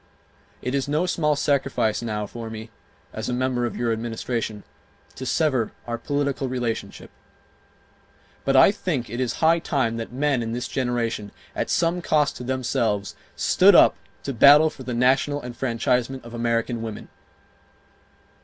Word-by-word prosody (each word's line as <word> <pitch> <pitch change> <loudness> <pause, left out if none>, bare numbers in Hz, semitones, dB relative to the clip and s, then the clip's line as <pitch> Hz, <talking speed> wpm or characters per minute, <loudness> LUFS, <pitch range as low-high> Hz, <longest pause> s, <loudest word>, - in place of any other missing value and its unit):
It 125 - -2
is 140 -1 0
no 150 +5 +1
small 150 -4 +1
sacrifice 135 -6 0
now 105 -3 -3
for 115 +2 -7
me, 110 +1 -8 0.4
as 110 +2 -4
a - - -1
member 125 -1 0
of - - -7
your 120 -1 0
Administration, 115 -1 -4 0.5
to 130 - -7
sever 135 -8 +1
our 120 -1 -4
political 140 0 -1
relationship. 120 -3 -4 1.3
But 135 - +1
I 130 - +7
think 160 - -3
it 120 - -4
is 125 -3 0
high 165 +1 +5
time 130 -9 -1
that 115 0 -5
men 135 0 0
in 115 0 -3
this 120 +1 -3
generation, 120 -5 -2 0.2
at - - -2
some 170 +1 +1
cost 150 -4 +1
to - - -7
themselves, 115 -5 -1 0.2
stood - - +5
up - - +7 0.3
to 140 - -3
battle 145 +6 +7
for - - -13
the 125 -1 -4
national 135 +4 +2
enfranchisement 125 +1 -1
of 120 - -10
American 115 0 -1
women. 110 -2 -6
125 Hz, 155 wpm, -24 LUFS, 115-140 Hz, 1.3 s, I